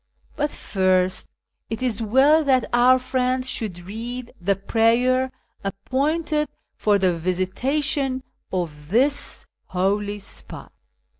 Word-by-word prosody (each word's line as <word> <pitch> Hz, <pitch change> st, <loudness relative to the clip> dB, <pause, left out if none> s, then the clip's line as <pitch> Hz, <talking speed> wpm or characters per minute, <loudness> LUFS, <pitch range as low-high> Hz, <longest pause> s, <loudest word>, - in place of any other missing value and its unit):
But 295 Hz, 0 st, 0 dB
first 185 Hz, -5 st, 0 dB, 0.4 s
it 225 Hz, +3 st, -3 dB
is 235 Hz, -3 st, 0 dB
well 270 Hz, +8 st, +5 dB
that 260 Hz, -3 st, +3 dB
our 250 Hz, +2 st, +6 dB
friend 255 Hz, 0 st, 0 dB
should 210 Hz, -8 st, -3 dB
read 235 Hz, +6 st, -6 dB
the 200 Hz, +3 st, +2 dB
prayer 240 Hz, +6 st, +2 dB, 0.3 s
appointed 300 Hz, -, -1 dB, 0.3 s
for 205 Hz, -1 st, +3 dB
the 185 Hz, -3 st, +2 dB
visita 185 Hz, -, -1 dB
tion 270 Hz, -3 st, 0 dB, 0.3 s
of 155 Hz, -5 st, -4 dB
this 270 Hz, +8 st, +1 dB, 0.2 s
holy 205 Hz, +3 st, 0 dB
spot." 205 Hz, -, -9 dB
235 Hz, 115 wpm, -23 LUFS, 190-260 Hz, 0.4 s, our